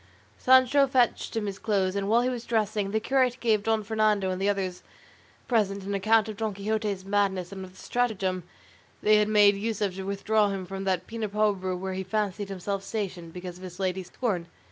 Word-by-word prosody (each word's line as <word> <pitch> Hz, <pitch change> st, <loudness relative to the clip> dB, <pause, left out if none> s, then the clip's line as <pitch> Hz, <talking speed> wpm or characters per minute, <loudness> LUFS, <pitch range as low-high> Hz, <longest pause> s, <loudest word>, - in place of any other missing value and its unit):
Sancho 260 Hz, +2 st, +5 dB
fetched 255 Hz, -3 st, +1 dB
him 220 Hz, -, -1 dB
his 200 Hz, -1 st, -5 dB
clothes; 200 Hz, -3 st, 0 dB
and 200 Hz, 0 st, -1 dB
while 235 Hz, +2 st, +4 dB
he 250 Hz, -, +1 dB
was 245 Hz, -2 st, -4 dB
dressing, 215 Hz, -3 st, 0 dB
the 220 Hz, +2 st, 0 dB
curate 255 Hz, +1 st, +1 dB
gave 220 Hz, -3 st, +2 dB
Don 220 Hz, 0 st, 0 dB
Fernando 210 Hz, -2 st, +1 dB
and 185 Hz, +1 st, -3 dB
the 200 Hz, -, +2 dB
others 190 Hz, -3 st, -2 dB, 0.7 s
present 200 Hz, -5 st, +1 dB
an 200 Hz, +1 st, -3 dB
account 215 Hz, +2 st, +3 dB
of 215 Hz, -2 st, -6 dB
Don 220 Hz, -2 st, -2 dB
Quixote's 205 Hz, -1 st, -2 dB
madness 195 Hz, -3 st, 0 dB
and 190 Hz, -1 st, -6 dB
of 185 Hz, -1 st, -11 dB
the -, -, -19 dB
stratagem 195 Hz, -7 st, -1 dB, 0.6 s
they 215 Hz, 0 st, +6 dB
had 210 Hz, 0 st, +3 dB
made 205 Hz, -1 st, +6 dB
use 215 Hz, +1 st, -3 dB
of 200 Hz, -3 st, 0 dB
to 190 Hz, +1 st, -6 dB
withdraw 205 Hz, +2 st, +1 dB
him 195 Hz, -2 st, -3 dB
from 195 Hz, +1 st, -6 dB
that 185 Hz, -2 st, 0 dB
Pena 225 Hz, -2 st, -4 dB
Pobre 200 Hz, -3 st, 0 dB
where 190 Hz, +1 st, -4 dB
he 190 Hz, +1 st, -3 dB
fancied 205 Hz, 0 st, -2 dB
himself 195 Hz, +1 st, -3 dB
stationed 190 Hz, -5 st, -4 dB
because 180 Hz, 0 st, -7 dB
of -, -, -12 dB
his 180 Hz, 0 st, -9 dB
lady's 185 Hz, -1 st, -2 dB
scorn. 180 Hz, -5 st, -2 dB
200 Hz, 210 wpm, -27 LUFS, 190-220 Hz, 0.7 s, they